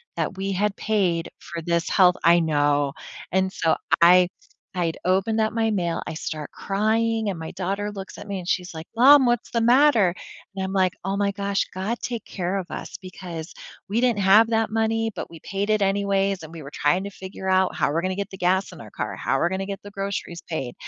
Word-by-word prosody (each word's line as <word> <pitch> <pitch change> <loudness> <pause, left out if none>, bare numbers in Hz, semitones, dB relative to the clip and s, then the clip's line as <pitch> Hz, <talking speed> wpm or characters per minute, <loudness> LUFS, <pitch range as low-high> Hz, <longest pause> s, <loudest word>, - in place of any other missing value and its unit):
that 190 - -2
we 195 +1 -2
had 205 +2 0
paid 185 -6 0
for 170 -1 -7
this 170 0 0
health 180 -1 +5
I 170 +1 +6
know. 145 -3 +1 0.4
And 190 +1 +1
so 160 - +1 0.3
I 180 +1 +7 0.4
I'd 170 -3 -1
opened 195 +5 +1
up 220 - +1
my 225 0 +1
mail, 175 -5 -1
I - - -4
start 155 -1 -5
crying, 220 +2 0
and 185 - -3
my 160 0 -6
daughter 200 +3 -3
looks 195 -1 -8
at - - -9
me, 195 -1 -3
and 175 - -9
she's 180 -2 -1
like, 160 +1 -8
"Mom, 270 +3 +7
what's 240 -1 0
the 235 - +1
matter?" 235 -6 +4 0.4
and 190 - -3
I'm 190 - -3
like, 185 -2 +2
"Oh 195 +1 -2
my 200 -1 +1
gosh." 200 0 -1
God 200 +6 -2
take 235 -3 -4
care 185 +1 -3
of 185 - -4
us - - -6
because 175 -3 -8 0.4
we 220 +3 +1
didn't 240 -4 +2
have 210 +4 +6
that 225 0 +2
money, 225 0 0
but 180 - -6
we 165 -1 -12
paid 200 +2 -3
it 215 -1 +2
anyways, 195 -1 +1
and 160 +1 -10
we 165 - -8
were 140 - -10
trying 180 +6 +1
to 200 - -5
figure 190 0 -7
out 185 0 +2
how - - +1
we're 165 +2 0
gonna 185 0 -2
get 200 0 -4
the 190 - -8
gas 185 +2 +1
in - - -12
our - - -11
car, - - -4
how - - 0
we're 170 - +2
gonna 190 +1 -3
get 200 0 -6
the 205 - -10
groceries 195 -3 -4
paid. 135 -7 -4
190 Hz, 225 wpm, -24 LUFS, 175-210 Hz, 0.4 s, I